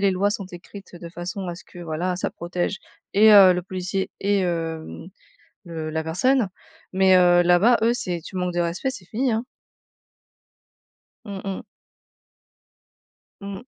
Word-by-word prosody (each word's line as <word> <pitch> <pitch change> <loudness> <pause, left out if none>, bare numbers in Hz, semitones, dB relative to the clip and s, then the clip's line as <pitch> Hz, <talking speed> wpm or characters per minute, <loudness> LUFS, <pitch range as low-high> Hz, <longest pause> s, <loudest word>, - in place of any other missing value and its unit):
les 200 -1 +3
lois 195 +2 +1
sont 205 -3 -4
écrites 185 +1 -12
de 170 0 -9
façon 180 +2 -6
à 175 - -4
ce 170 - -12
que, 175 - -15
voilà, 175 +2 -2
ça - - -2
protège 175 +3 -3 0.4
et 215 +2 +7
heu, 195 -3 +9
le 180 0 -2
policier 185 +1 -3
et 200 0 +1
hem, 165 -2 -3 0.6
le 160 -2 -5
la 160 0 -2
personne 210 +7 +1 0.4
mais 190 0 +5
heu, 175 -1 +5
là-bas, 180 +8 +5
eux, 235 - +4
c'est 180 -8 -3
tu 185 - -11
manques 180 -1 -1
de - - 0
respect, 170 +9 -1
c'est 230 -9 -9
fini, 245 +6 -1
hein. 225 +3 -1 1.8
Mmh 200 -3 -6
mh. 195 -1 -4 1.8
Mmh. 200 +3 -7
185 Hz, 155 wpm, -23 LUFS, 175-200 Hz, 1.8 s, heu